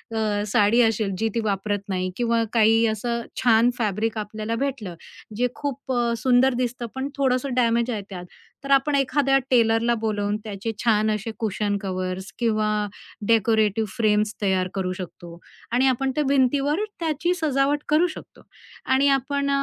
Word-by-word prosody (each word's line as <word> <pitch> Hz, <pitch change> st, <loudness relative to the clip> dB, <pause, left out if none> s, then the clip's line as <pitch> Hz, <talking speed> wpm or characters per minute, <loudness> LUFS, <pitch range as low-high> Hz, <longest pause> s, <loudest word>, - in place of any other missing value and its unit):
अ, 220 Hz, -, 0 dB, 0.3 s
साडी 210 Hz, +4 st, +3 dB
असेल, 220 Hz, -3 st, +1 dB
जी 225 Hz, +3 st, 0 dB
ती -, -, +1 dB
वापरत 205 Hz, 0 st, -1 dB
नाही 185 Hz, -1 st, -1 dB
किंवा 235 Hz, -1 st, +1 dB
काही 225 Hz, 0 st, +4 dB
असं 235 Hz, +2 st, -2 dB, 0.2 s
छान 235 Hz, -1 st, +5 dB
फॅब्रिक 220 Hz, 0 st, -1 dB
आपल्याला 215 Hz, +1 st, -4 dB
भेटलं. 235 Hz, -11 st, -4 dB, 0.4 s
जे 245 Hz, +3 st, +1 dB
खूप 280 Hz, -2 st, -5 dB
अ, 240 Hz, -1 st, +1 dB
सुंदर 255 Hz, +2 st, +3 dB
दिसतं, 245 Hz, 0 st, -4 dB
पण 265 Hz, +1 st, -3 dB
थोडंसं 265 Hz, -1 st, 0 dB
डॅमेज 235 Hz, 0 st, +2 dB
आहे 215 Hz, -3 st, -3 dB
त्यात. 180 Hz, -2 st, -7 dB, 0.4 s
तर 275 Hz, -, -3 dB
आपण 275 Hz, +2 st, +3 dB
एखाद्या 275 Hz, 0 st, +2 dB
टेलरला 230 Hz, -1 st, +3 dB
बोलावून, 205 Hz, -2 st, -1 dB
त्याचे 210 Hz, 0 st, -4 dB
छान 215 Hz, -2 st, +3 dB
असे 215 Hz, +2 st, -3 dB
कुशन 210 Hz, -2 st, -1 dB
कव्हर्स 185 Hz, -1 st, -4 dB
किंवा 215 Hz, -3 st, +1 dB, 0.6 s
डेकोरेटिव 220 Hz, -1 st, +2 dB
फ्रेम्स 215 Hz, -2 st, +1 dB
तयार 190 Hz, -2 st, +1 dB
करू 190 Hz, -2 st, -2 dB
शकतो 175 Hz, -1 st, -9 dB, 0.3 s
आणि 250 Hz, +3 st, +3 dB
आपण 265 Hz, +1 st, +1 dB
त्या 300 Hz, -, +1 dB
भिंतीवर 280 Hz, +5 st, +2 dB, 0.2 s
त्याची 330 Hz, +1 st, 0 dB
सजावट 290 Hz, -3 st, +1 dB
करू 310 Hz, +4 st, +4 dB
शकतो. 330 Hz, -, -11 dB, 0.5 s
आणि 270 Hz, +2 st, +4 dB
आपण 280 Hz, +2 st, -2 dB
230 Hz, 155 wpm, -23 LUFS, 210-265 Hz, 0.6 s, छान